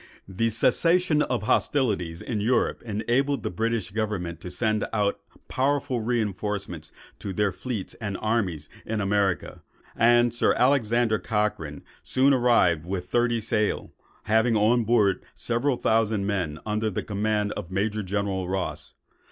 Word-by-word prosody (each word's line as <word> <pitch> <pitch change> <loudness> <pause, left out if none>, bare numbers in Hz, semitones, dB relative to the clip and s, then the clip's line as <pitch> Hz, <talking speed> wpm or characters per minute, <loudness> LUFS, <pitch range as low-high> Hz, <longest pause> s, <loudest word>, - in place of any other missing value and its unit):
The 100 +5 0
cessation 160 - +3
of 125 -7 -1
hostilities 100 - 0
in 110 -4 -2
Europe, 120 +4 +1
enabled 120 +6 0
the - - -2
British 110 0 -2
government 95 -6 -3
to 90 - -7
send 110 +2 0
out 105 -2 0 0.3
powerful 135 -1 0
reinforcements 105 -7 -3 0.3
to 100 - -5
their 105 +1 +1
fleets 105 +1 -5
and 100 -3 -3
armies 100 -9 -1 0.2
in 110 -1 -3
America; 100 -2 0 0.3
and 120 0 +4
Sir 120 - +2
Alexander 120 -4 +2
Cochrane 105 -9 -2 0.2
soon 135 +2 +3
arrived 120 - +3
with 90 0 -4
thirty 120 -1 +2
sail, 110 -1 -1 0.3
having 110 +2 +2
on 110 +2 +3
board 105 -4 +2
several 120 +3 0
thousand 110 -3 +1
men, 90 -7 -2
under 110 +1 -1
command 105 0 -1
of 85 - -6
Major 105 +3 -1
General 95 -2 -2
Ross. 95 -1 -4
110 Hz, 135 wpm, -25 LUFS, 100-120 Hz, 0.3 s, and